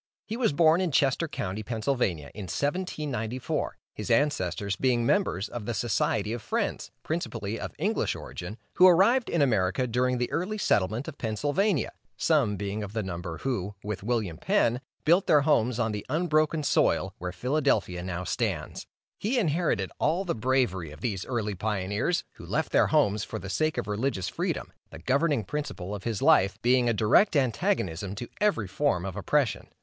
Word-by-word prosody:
He 220 - -4
was 235 -6 +2
born 160 +3 +4
in 185 - +1
Chester 140 +4 +2
county, 110 -8 -4
Pa., 115 +2 -4
in 110 - -4 0.7
1794, 140 - -2 0.2
his - - -6
ancestors 100 -8 +1
being 120 -1 +1
members 120 - +1
of 115 -4 -7
the 120 - -1
Society 110 -2 0
of 120 - -4
Friends, - - -2
principally 115 -10 -3
of - - -6
English - - 0
origin, 90 +5 -7 0.2
who 185 - +9
arrived 205 +8 +5
in 165 -4 +2
America 110 -1 +1
during 125 +1 +1
the 125 0 -2
early 200 +5 -1
settlement 110 - +1
of 155 - -8
Pennsylvania, 145 - 0 0.3
some 140 -11 +2
being 100 +2 -3
of 105 -1 -6
the 110 -1 -1
number 85 -2 -5
who, 105 -7 -3
with 105 -1 -4
William 105 -6 -2
Penn, 120 +2 +2 0.2
built 175 +5 +4
their 150 - +6
homes 125 -5 +2
on 115 -2 0
the 105 -1 -4
unbroken 155 0 +1
soil, - - +2
where 90 0 -4
Philadelphia 110 -4 0
now 90 0 -4
stands. - - -3 0.3
He 235 +6 0
inherited 160 - +1
all 170 +6 +1
the 175 - 0
bravery 115 - 0
of 75 - -12
these 100 -7 -3
early 110 -5 -1
pioneers, 105 - -1
who - - -10
left - - -1
their - - +4
homes 105 +1 +2
for - - -5
the 95 +2 -6
sake 155 +11 0
of - - -1
religious 105 -2 -1
freedom, - - -3 0.2
the 80 - -10
governing 140 - +1
principle 105 -7 -4
of 100 -2 -7
his 115 -4 -2
life 100 +2 +4
being 125 0 +4
a - - +4
direct 115 - +4
antagonism 115 - 0
to 120 +3 -6
every 200 - +2
form 95 -2 0
of 95 - -5
oppression. - - 0
120 Hz, 175 wpm, -27 LUFS, 100-150 Hz, 0.7 s, who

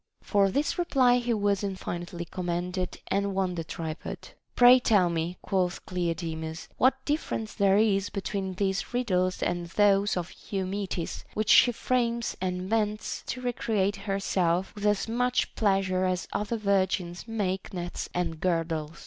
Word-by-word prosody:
For 200 -2 +3
this 290 - 0
reply 255 -7 +4
he 240 0 -2
was 205 -1 +1
infinitely 175 -3 -4
commended 180 +1 -3
and 200 0 0
won 190 -2 0
the 165 -2 -3
tripod. 160 0 -6 0.3
Pray 245 +1 +8
tell 200 -8 +3
me, 170 +2 -2
quoth 185 -2 -1
Cleodemus, 165 -2 -3
what 265 +1 +3
difference 290 -7 -2
there 200 -2 +3
is 205 -2 +2
between 195 -1 -3
these 195 +4 -1
riddles 185 -7 +1
and 175 0 -1
those 200 +2 +3
of 175 -1 -4 0.2
Eumetis, 190 -2 -3
which 215 0 +1
she 245 - +7
frames 235 -1 0
and 180 -1 -1
invents 210 +2 -1
to 250 - -4
recreate 215 -5 0
herself 195 -3 0
with 210 0 -2
as 210 +1 +1
much 245 +2 0
pleasure 195 -3 +1
as 185 -1 -1
other 210 +3 -1
virgins 190 -3 0
make 195 -4 -2
nets 175 -2 -5
and 175 -3 -2
girdles 165 -2 -1
195 Hz, 145 wpm, -28 LUFS, 180-215 Hz, 0.3 s, Pray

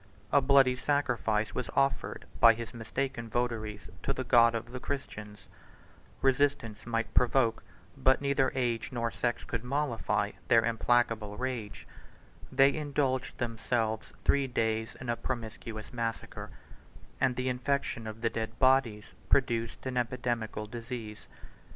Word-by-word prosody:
A 140 - +5
bloody 135 -1 +5
sacrifice 120 -6 0
was 125 - -3
offered 135 0 0
by 115 -1 +8
his 115 +1 -7
mistaken 120 0 -3
votaries 110 -3 -2
to 135 - -1
the 130 - -3
God 115 -2 +5
of 115 +1 -4
the 125 - -5
Christians: 105 -7 -6 0.8
resistance 135 -5 +1
might 115 -1 -1
provoke 125 -2 +3 0.3
but 130 0 +3
neither 140 -1 +2
age 120 -2 -1
nor 115 -2 -1
sex 120 0 -1
could 115 -1 -4
mollify, 135 -2 0 0.2
their 115 -1 +5
implacable 115 -2 +1
rage: 125 -5 -4 0.7
they 135 +1 +5
indulged 140 -3 -1
themselves 115 -2 -1
three 140 -1 +3
days 110 -2 -1
in 130 - -7
a 120 - +1
promiscuous 115 -3 -5
massacre; 115 -2 -4 0.7
110 135 - +4
and 125 - -3
the 125 +1 -2
infection 125 -2 -1
of 110 +1 -7
the 115 - +2
dead 110 0 -4
bodies 130 -5 +2 0.2
produced 115 -4 +1
an 130 -1 -2
epidemical 120 -3 -1
disease. 115 -1 -7
120 Hz, 135 wpm, -30 LUFS, 115-130 Hz, 0.8 s, by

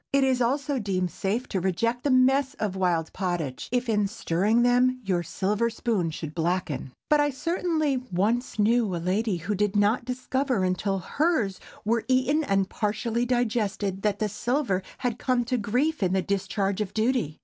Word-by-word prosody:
It 275 0 +3
is 260 -1 +2
also 275 +3 0
deemed 185 -4 -1
safe 220 +6 -2
to 195 - -1
reject 230 +7 0
the 290 - +1
mess 265 +2 +3
of 205 -3 -2
wild 175 -4 0
pottage, 175 -8 -3
if 245 0 0
in 210 -3 +2
stirring 210 +3 +1
them, 250 +1 +3
your 185 -4 0
silver 205 +7 0
spoon 220 -6 -1
should 155 -1 -6
blacken. 170 -5 -2 0.2
But 300 - +4
I 290 0 +3
certainly 310 -1 0
once 220 +9 0
knew 220 -2 +2
a - - -1
lady 190 +4 0
who 180 +6 -3
did 205 +1 0
not 205 +4 +3
discover 255 -2 -1
until 185 +2 0
hers 230 - 0 0.3
were 230 +1 +1
eaten 260 +4 +2
and 195 -7 +1
partially 225 +4 -1
digested, 215 -5 0
that 205 -1 +1
the 215 - 0
silver 235 -1 -1 0.2
had 245 -3 -2
come 255 -2 +1
to 250 +1 0
grief 255 +9 0
in 185 -1 +1
the 190 -1 +1
discharge 200 0 -1
of 205 - -4
duty. 220 - 0
215 Hz, 175 wpm, -26 LUFS, 190-255 Hz, 0.3 s, But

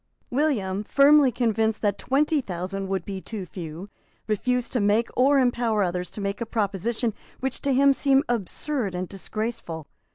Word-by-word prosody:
William, 225 -9 0
firmly 280 +2 +5
convinced 225 -2 0
that 205 -2 +1
twenty 295 +2 +2
thousand 190 -1 -4
would 190 -3 -2
be 195 -2 -5
too 205 -3 -6
few, 170 +1 -7 0.4
refused 250 +3 0
to 250 - 0
make 210 +3 +2
or 275 +3 +4
empower 240 -5 +2
others 180 0 -2
to - - -9
make 200 +2 -3
a - - 0
proposition 220 +2 -1 0.3
which 265 -1 -3
seemed 275 0 +4
to - - -5
him 270 +1 +6
absurd 235 0 -2
and 180 +1 -3
disgraceful. 195 -5 -5
220 Hz, 160 wpm, -25 LUFS, 195-255 Hz, 0.4 s, him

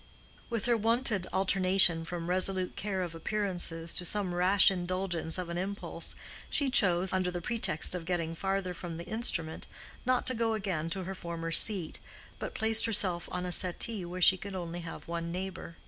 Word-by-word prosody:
With 230 -4 -3
her 240 -1 +2
wonted 225 -3 0
alternation 190 -3 +4
from 170 0 -6
resolute 185 0 +1
care 190 -2 -3
of 175 -2 -6
appearances 175 -2 -3
to - - 0
some 185 0 +1
rash 185 +3 +5
indulgence 180 -2 -3
of 180 -1 -4
an 170 +1 -3
impulse, 200 +2 -5 0.3
she 280 -3 +1
chose, 185 -6 +3
under 185 -1 0
the 175 0 -4
pretext 215 -5 0
of 175 -2 -4
getting 165 -2 -2
farther 195 +1 -3
from 170 -1 -8
the 170 - -8
instrument, 175 -8 -1 0.4
not 255 0 0
to 255 - +1
go 225 -2 -1
again 180 -6 -3
to 190 +2 -3
her 190 +2 -5
former 170 -2 -6
seat, 180 -2 +6 0.4
but - - -6
placed 220 0 +4
herself 185 -6 +1
on 180 0 -3
a 180 - -4
settee 185 +3 +1
where 180 +1 -4
she 190 - +6
could 195 +1 -8
only 175 -1 -6
have 165 -1 -9
one 170 0 -4
neighbor. 185 -2 -7
185 Hz, 180 wpm, -30 LUFS, 170-200 Hz, 0.4 s, seat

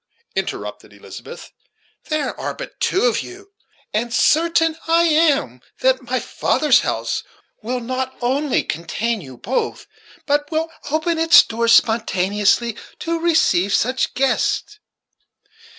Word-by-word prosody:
interrupted - - -4
Elizabeth. - - -11 0.6
"There 305 -2 -1
are - - -4
but - - -9
two 380 - +1
of 485 - +2
you; 395 +2 -12 0.4
and 235 +3 -1
certain 325 +4 +3
I 335 +1 +4
am 300 - +2 0.2
that 260 0 +3
my 250 0 -2
father's 300 +4 +2
house - - -2 0.4
will 245 +3 -3
not 260 +2 -4
only 270 +3 0
contain 210 +7 -3
you 130 -5 -11
both, 250 - -3 0.4
but 290 0 0
will 325 0 -2 0.2
open 320 +2 0
its 325 +1 +7
doors 230 +1 +1
spontaneously 210 0 +2 0.2
to 335 0 -2
receive 205 - +2
such 255 +2 0
guests. 270 +10 0
260 Hz, 120 wpm, -20 LUFS, 230-325 Hz, 0.6 s, its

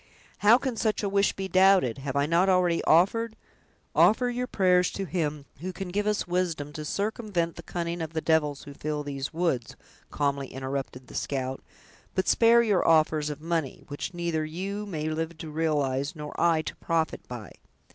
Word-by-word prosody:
"How 215 +3 +7
can 260 -3 -3
such 215 -1 0
a - - +1
wish 200 0 +2
be 195 0 -4
doubted! 185 - +4
Have 135 0 -4
I 140 0 +3
not 170 +5 +3
already 180 -2 +3
offered—" 220 +7 +3 0.6
"Offer 245 +3 +4
your 250 +1 -2
prayers 180 -5 +3
to 195 - -3
Him 150 -6 -2
who 185 +4 -4
can 190 0 -6
give 205 +3 -1
us 210 -1 +1
wisdom 175 -5 -2
to 155 - -5
circumvent 200 -1 -2
the - - -8
cunning 170 0 -4
of 160 0 -5
the 160 - 0
devils 150 -3 +1
who 145 - -10
fill 150 +1 -3
these 140 -1 -4
woods," 160 -8 -1 0.3
calmly 140 -2 -1
interrupted 130 -1 -5
the - - -14
scout, 130 -1 -3 0.5
"but 185 - 0
spare 235 0 +5
your 205 -5 +2
offers 155 -2 +3
of 150 0 -6
money, 165 -4 -2
which 145 +5 -4
neither 170 -3 -1
you 195 +6 -4
may 155 -5 -3
live 160 +1 -3
to 160 -1 -7
realize, 145 -2 0
nor 150 -1 -7
I 165 -2 +3
to - - -5
profit 165 -1 -1
by. 120 -4 -8
165 Hz, 185 wpm, -27 LUFS, 150-190 Hz, 0.6 s, How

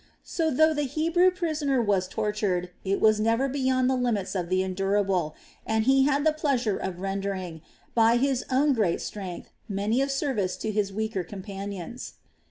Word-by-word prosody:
So 325 -2 -1
though 315 +3 +4
the 295 - -1
Hebrew 335 +5 +3
prisoner 310 -7 -1
was 200 -5 +1
tortured, 205 -4 -1
it 195 +1 0
was 215 -1 +4
never 230 +5 +2
beyond 260 -1 +1
the 260 - +2
limits 235 -6 -1
of 180 -3 -2
the 185 0 +2
endurable, 190 -3 0 0.3
and 220 0 0
he 265 +2 +4
had 285 +1 +1
the 315 - +4
pleasure 260 -9 0
of 185 -1 -5
rendering, 195 -4 -3 0.3
by 230 0 +4
his 265 0 +1
own 275 +2 +3
great 210 -8 +1
strength, 190 -4 -7 0.2
many 210 +5 0
a 275 - 0
service 265 -9 -1
to 220 - -3
his 205 -2 0
weaker 215 -2 -2
companions. 200 +3 -7
220 Hz, 170 wpm, -26 LUFS, 195-270 Hz, 0.3 s, though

